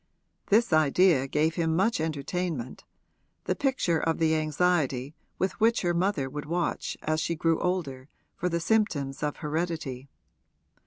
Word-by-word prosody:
This 220 -2 +3
idea 155 -1 +4
gave 155 +3 +1
him 165 -2 0
much 200 +5 +2
entertainment 155 -3 -3 0.6
the - - 0
picture 255 - +1
of 165 0 0
the 160 -1 +2
anxiety 155 -4 0 0.2
with 190 +1 0
which 230 0 +3
her 175 -1 +1
mother 170 -6 0
would 145 +3 -6
watch 175 +2 -2
as 155 0 0
she 170 - -1
grew 165 0 +1
older 150 -7 -2 0.3
for 180 - -1
the 170 -1 -1
symptoms 165 -9 0
of 150 -1 -1
heredity. 155 -4 -3
160 Hz, 145 wpm, -27 LUFS, 145-180 Hz, 0.6 s, idea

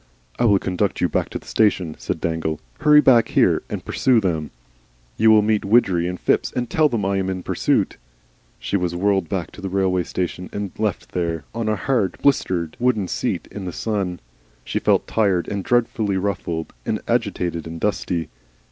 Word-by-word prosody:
"I 120 - +3
will 100 -3 +5
conduct 95 +1 -1
you 90 - +3
back - - -1
to - - -4
the - - -14
station," 95 -7 +1
said - - -3
Dangle; 80 -2 -2 0.2
"hurry 150 0 +6
back 120 -5 +5
here, - - +3
and - - -5
pursue 125 -3 +3
them. 80 -7 -1 0.7
You 110 +1 +4
will 110 -1 +6
meet 105 0 +1
Widgery 95 -5 +3
and 90 -1 -4
Phipps - - +1
and 125 -1 -2
tell 155 +3 +3
them 115 -6 -1
I 100 0 +1
am 95 -1 -1
in 95 -1 -4
pursuit." - - 0 0.6
She - - -3
was 90 -3 0
whirled 95 -2 +1
back 90 -4 -3
to - - -12
the 95 - -4
railway 95 -1 +1
station 90 +1 -4
and 100 -2 -4
left 105 -4 -2
there, 85 -3 -2
on 115 -1 -2
a 105 - +2
hard, 105 -2 0
blistered, 90 - +1
wooden 120 -6 +1
seat - - -2
in 100 -2 -6
the 90 - -3
sun. 95 -3 -2 0.5
She - - -1
felt - - +2
tired 100 -6 +1
and 100 -1 -3
dreadfully 115 -4 +1
ruffled 90 -4 -3
and - - -1
agitated 85 -2 -1
and 80 0 -7
dusty. 85 -4 -1
95 Hz, 190 wpm, -22 LUFS, 90-110 Hz, 0.7 s, hurry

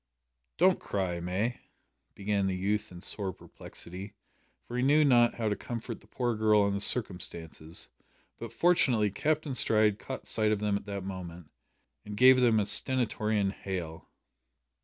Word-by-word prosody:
"Don't 185 +3 +4
cry, 95 -3 -2
May," 95 +8 -2 0.6
began 100 -1 -1
the 95 - -1
youth 105 +3 -2
in 90 -1 -11
sore 100 0 -4
perplexity, 95 +3 -10 0.5
for 120 - -7
he 125 - 0
knew 150 +4 +4
not 120 -3 +4
how 115 -2 -2
to 105 - 0
comfort 115 0 -6
the - - -21
poor 120 -2 -1
girl 105 -1 +3
in 100 - 0
the 100 - -2
circumstances, 85 -7 0 0.5
but 115 -2 -7
fortunately 120 - +2
Captain 150 +4 -1
Stride 110 -4 +3
caught - - -7
sight 110 -1 0
of 110 - +1
them 105 0 -1
at 100 - -5
the 100 -1 -4
moment, 90 -4 -8 0.5
and 105 0 -8
gave 130 +2 +7
them 115 -3 +4
a 105 - +1
stentorian 105 -2 +1
hail. 90 -5 -6
105 Hz, 160 wpm, -29 LUFS, 95-120 Hz, 0.6 s, gave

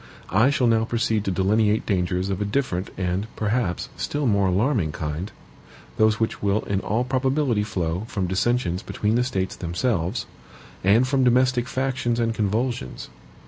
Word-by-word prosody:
I 110 +8 +4
shall 140 -3 +1
now 115 -1 +3
proceed 115 -2 0
to 95 - 0
delineate 105 +3 +2
dangers 90 -1 0
of 95 +1 -2
a - - +1
different 100 -5 -1
and, 90 +3 -1
perhaps, 105 -4 -1
still 145 0 -2
more 100 -5 +3
alarming 95 - +1
kind 80 +5 -4 0.7
those 110 0 +3
which 115 - -1
will 100 +1 +1
in 100 -1 -1
all 110 +5 0
probability 130 -2 +1
flow 90 -2 -2
from 100 -6 -2
dissensions 95 -1 0
between 105 +1 -1
the 120 +1 +3
States 95 -7 -2
themselves, 90 +3 -1 0.6
and 110 +7 +4
from 135 0 +2
domestic 125 0 +3
factions 130 -3 -1
and 115 -1 +1
convulsions. 110 - -2
110 Hz, 155 wpm, -24 LUFS, 95-125 Hz, 0.7 s, I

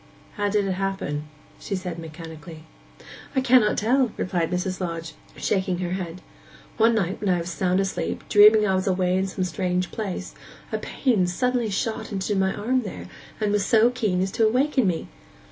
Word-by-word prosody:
'How 205 -1 -1
did 205 0 +1
it 195 - -1
happen?' 185 -6 -2 0.3
she 200 - -4
said 180 -3 -5
mechanically. 160 0 -9 0.7
'I 265 - +3
cannot 250 -4 +4
tell,' 245 +2 +2
replied 175 -3 -1
Mrs. 180 +1 -2
Lodge, 165 -2 -4 0.2
shaking 190 -2 0
her 175 -1 -3
head. 180 -1 -5 0.5
'One 230 +1 +4
night 190 -3 -1
when 205 - 0
I 180 - +3
was 170 0 -4
sound 185 +1 +1
asleep, 195 -1 -2
dreaming 210 +1 +7
I 190 - +2
was 185 +1 0
away 185 -1 +1
in 190 +1 +1
some 185 0 -3
strange 180 +1 -1
place, 205 -5 -4 0.4
a - - -1
pain 215 -9 +1
suddenly 245 +5 0
shot 220 +3 -2
into 200 +1 -1
my 190 0 +2
arm 250 +6 0
there, 200 -6 -7 0.3
and 210 -2 0
was 205 -1 +2
so 225 +4 +4
keen 215 -8 0
as 190 - -2
to 220 +2 +3
awaken 260 0 +2
me. 170 -3 -1
190 Hz, 180 wpm, -24 LUFS, 180-215 Hz, 0.7 s, dreaming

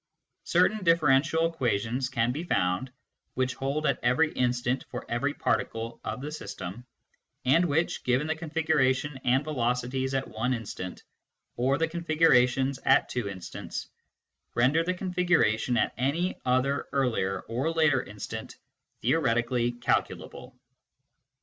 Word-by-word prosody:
Certain 215 -2 +2
differential 160 -1 +3
equations 125 -5 -1
can 120 -1 +1
be 150 +6 -4
found, 95 - 0 0.4
which 130 -1 0
hold 140 +3 -2
at 140 -4 +1
every 125 +6 +3
instant 125 +1 0
for 125 - -6
every 125 +5 0
particle 115 +1 -2
of 110 +4 -4
the 150 +2 -5
system, 110 - -7 0.6
and 165 +8 +4
which, 160 +1 0
given 125 +4 +1
the 160 - 0
configuration 150 -4 0
and 130 +3 +3
velocities 130 -1 -1
at 135 0 -1
one 125 +4 -1
instant, 100 -5 -7 0.5
or 130 +3 +1
the 165 - +1
configurations 140 -6 +2
at - - +4
two 120 -5 -2
instants, 95 -3 -7 0.7
render 135 +7 +3
the 180 +2 -1
configuration 175 - +1
at - - +1
any 160 +8 0
other 130 +2 +1
earlier 125 -8 0
or 130 +8 -2
later 155 -5 +3
instant 105 -3 -7 0.5
theoretically 120 -3 +1
calculable. 120 0 -3
130 Hz, 125 wpm, -28 LUFS, 120-155 Hz, 0.7 s, and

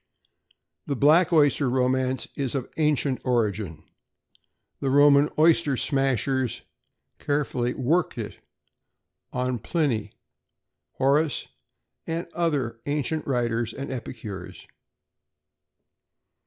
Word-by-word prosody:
The 140 - -1
black 155 +7 +4
oyster 145 -4 +3
romance 130 0 0
is 135 -1 -2
of 130 -2 -4
ancient 150 -4 +1
origin. 105 - -1 1.0
The 135 - -1
Roman 145 +1 +5
oyster 155 -3 +4
smashers 135 -2 0 0.6
successfully 130 -4 -1
"worked 155 +7 0
it" - - -6 0.9
on 125 -1 -1
Pliny, 115 - -1 0.8
Horace, 140 +2 +1 0.6
and 165 +1 -2
other 145 -9 -1
ancient 150 +2 -1
writers 120 -3 -1
and 140 0 -5
epicures. 110 -7 -7
135 Hz, 85 wpm, -25 LUFS, 120-145 Hz, 1.0 s, Roman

